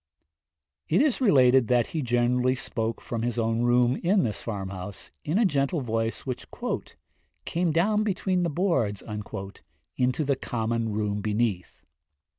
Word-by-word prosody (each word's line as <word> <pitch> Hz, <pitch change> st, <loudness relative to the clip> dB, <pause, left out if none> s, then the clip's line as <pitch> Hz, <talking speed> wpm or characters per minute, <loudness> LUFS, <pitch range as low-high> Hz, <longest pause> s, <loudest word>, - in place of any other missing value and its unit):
It 160 Hz, -, +3 dB
is 280 Hz, -2 st, +2 dB
related 130 Hz, -, +5 dB
that 120 Hz, -1 st, +3 dB
he 160 Hz, -, 0 dB
generally 125 Hz, +1 st, +2 dB
spoke 115 Hz, -2 st, -3 dB
from 115 Hz, -2 st, -4 dB
his 120 Hz, +1 st, -2 dB
own 115 Hz, 0 st, +1 dB
room 120 Hz, +1 st, +3 dB
in 190 Hz, +2 st, +2 dB
this 105 Hz, -, -2 dB
farm 100 Hz, -4 st, -4 dB
house, 95 Hz, +1 st, -8 dB
in 160 Hz, +6 st, 0 dB
a 230 Hz, -, +4 dB
gentle 145 Hz, -2 st, +1 dB
voice 115 Hz, -2 st, -2 dB
which 130 Hz, -2 st, -5 dB, 1.0 s
'came 170 Hz, 0 st, 0 dB
down 205 Hz, +7 st, +2 dB
between 190 Hz, -3 st, 0 dB
the 170 Hz, -, +1 dB
boards' 145 Hz, -, 0 dB, 0.9 s
into 125 Hz, +4 st, +1 dB
the 140 Hz, -1 st, +1 dB
common 115 Hz, -2 st, -2 dB
room 105 Hz, -1 st, -1 dB
beneath. 105 Hz, -3 st, -2 dB
125 Hz, 145 wpm, -26 LUFS, 115-160 Hz, 1.0 s, related